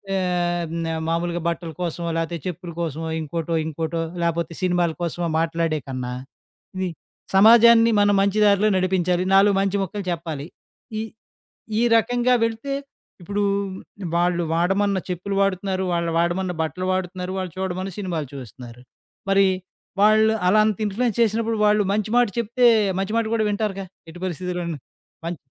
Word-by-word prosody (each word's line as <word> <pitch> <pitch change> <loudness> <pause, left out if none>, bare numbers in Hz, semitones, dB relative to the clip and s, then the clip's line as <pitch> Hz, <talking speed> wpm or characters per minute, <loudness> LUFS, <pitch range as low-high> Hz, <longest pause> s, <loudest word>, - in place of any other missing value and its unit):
ఆహ్, 175 -2 0 0.2
న - - -2 0.2
మామూలుగా 170 +1 -1
బట్టల 170 0 -4
కోసమో 170 -1 -3
లేతే 165 +1 -2
చెప్పుల 180 0 -6
కోసమో 160 0 -3
ఇంకోటో, 165 +2 -3
ఇంకోటో 160 +1 -3 0.2
లేపోతే 170 0 -1
సినిమాల 175 -2 +2
కోసమో 170 +1 -2
మాట్లాడే 165 -1 0
కన్నా 125 -1 -4 0.6
ఇది 185 -1 -1 0.5
సమాజాన్ని 230 +2 +7
మనం 205 0 +4
మంచి 200 +2 +1
దారిలో 205 +1 +4
నడిపించాలి. 180 -1 +1
నాలుగు 200 +1 +6
మంచి 195 0 0
ముక్కలు 200 +2 -5
చెప్పాలి. 160 -4 -4 0.5
ఈ - - -1 0.8
ఈ - - +2
రకంగా 245 +2 +2
వెళితే, 230 +5 -2 0.5
ఇప్పుడు 205 +4 -2 0.7
వాళ్ళు 175 0 +2
వాడమన్న 195 +4 +1
చెప్పులు 185 +3 -3
వాడుతున్నారు. 190 -1 0
వాళ్ళు 170 -1 0
వాడమన్న 175 +2 0
బట్టలు 180 +3 -3
వాడుతున్నారు. 185 0 -3
వాళ్ళు 185 -2 -3
చూడమన్న 190 0 -3
సినిమాలు 175 -7 -3
చూస్తున్నారు. 125 -2 -10 0.5
మరి 195 0 +5 0.6
వాళ్ళు 215 +1 +5
అలా 210 +4 +5
అంత 215 -3 0
ఇన్‌ఫ్లుయెన్స్ 215 +2 -1
చేసినప్పుడు 225 0 +1
వాళ్ళు 210 0 +4
మంచి 210 0 -1
మాట 245 0 +5
చెప్తే 235 +2 +3 0.3
మంచి 195 +3 -2
మాట 230 - +1
గూడా 220 -1 +1
వింటారు‌గా. 205 -2 -2 0.2
ఎట్టి 175 +2 -11
పరిస్థితిలోను 175 -2 -3 0.5
మన్ 170 -1 -3
185 Hz, 140 wpm, -23 LUFS, 170-205 Hz, 0.8 s, సమాజాన్ని